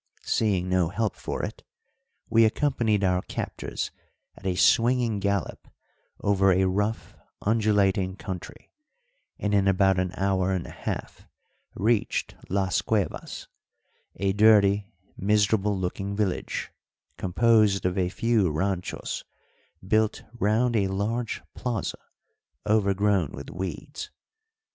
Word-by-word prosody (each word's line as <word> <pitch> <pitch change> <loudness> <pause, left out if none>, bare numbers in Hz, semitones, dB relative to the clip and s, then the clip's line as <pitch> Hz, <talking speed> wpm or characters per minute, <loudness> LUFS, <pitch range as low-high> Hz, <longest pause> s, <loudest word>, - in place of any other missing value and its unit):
Seeing 95 -5 +1
no 90 -3 +2
help 110 +2 -1
for - - -4
it, - - -8 0.7
we 115 0 +5
accompanied 110 -4 +1
our 90 -1 +2
captors - - -4 0.4
at 95 - -7
a 90 - 0
swinging 115 +2 +3
gallop 100 0 -2 0.5
over 95 -1 +3
a 95 +1 +3
rough, 105 +4 -1 0.3
undulating 100 -3 +2
country, 95 -4 -8 0.7
and 105 0 -1
in 100 -1 +3
about 95 -1 +3
an 90 -1 -1
hour 95 -1 +1
and 90 -3 -2
a - - -9
half - - -6 0.5
reached 110 +1 0 0.2
Las 95 -1 +1
Cuevas, 100 +1 -2 0.7
a 95 +1 0
dirty, 105 -1 +4 0.3
miserable 105 0 +2
looking 95 +2 -3
village, 100 -3 -2 0.5
composed 105 +1 +3
of 90 0 +1
a 90 -2 +1
few 110 -1 +2
ranchos 90 +4 -2 0.6
built 110 +1 +1
round 115 +1 +1
a 100 -3 +2
large 110 +5 -2
plaza 120 -5 -3 0.7
overgrown 100 -5 +2
with - - -8
weeds. 95 - -6
100 Hz, 115 wpm, -26 LUFS, 95-110 Hz, 0.7 s, we